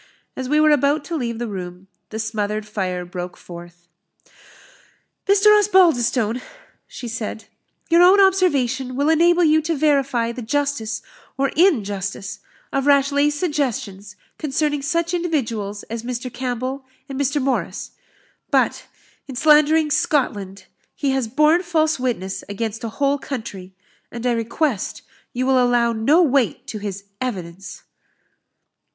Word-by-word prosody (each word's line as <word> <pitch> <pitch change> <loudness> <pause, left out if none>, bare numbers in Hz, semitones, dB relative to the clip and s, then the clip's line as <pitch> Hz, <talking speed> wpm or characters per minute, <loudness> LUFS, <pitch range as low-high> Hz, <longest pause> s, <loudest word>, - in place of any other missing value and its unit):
As 260 -1 -5
we 300 +1 +3
were 305 0 +5
about 290 +1 +2
to 335 - -4
leave 235 -6 -3
the 240 0 -3
room, 180 -2 -7 0.2
the 220 - -6
smothered 215 -1 -2
fire 185 -4 -3
broke 180 0 -7
forth. 175 0 -12 1.4
"Mr. 405 +2 +6
Osbaldistone," 260 - +3 0.5
she 245 - -8
said, 225 -1 -5 0.4
"your 340 +1 +5
own 370 +3 +7
observation 275 -10 +2
will 285 +3 +1
enable 345 +2 +4
you 315 -1 +4
to 325 +1 -1
verify 275 -5 +1
the 245 - -7
justice, 235 -3 -2 0.3
or 275 0 +1
injustice, 205 - 0 0.3
of 275 0 0
Rashleigh's 285 +1 +3
suggestions 230 - -3 0.2
concerning 295 0 -1
such 335 +4 -1
individuals 230 - -2
as 230 0 -6
Mr. 245 +1 -5
Campbell 255 +2 -3 0.2
and 270 -1 -6
Mr. 285 +2 +1
Morris. 270 -1 -2 0.6
But, - - +1 0.4
in 270 - -7
slandering 305 +2 +4
Scotland, 205 -10 -1 0.3
he 280 -2 0
has 265 -3 0
borne 305 +8 +3
false 315 -5 +1
witness 225 -7 -3
against 220 +2 -4
a 230 - -3
whole 280 +4 0
country; 220 -8 -7 0.4
and 235 +1 -6
I 250 - +3
request 235 +1 -2 0.3
you 255 +1 -2
will 260 -1 +4
allow 240 -1 +2
no 280 +11 +4
weight 275 -6 +1
to 215 - -5
his 200 -1 -5 0.2
evidence." 190 -6 -6
255 Hz, 135 wpm, -21 LUFS, 220-300 Hz, 1.4 s, own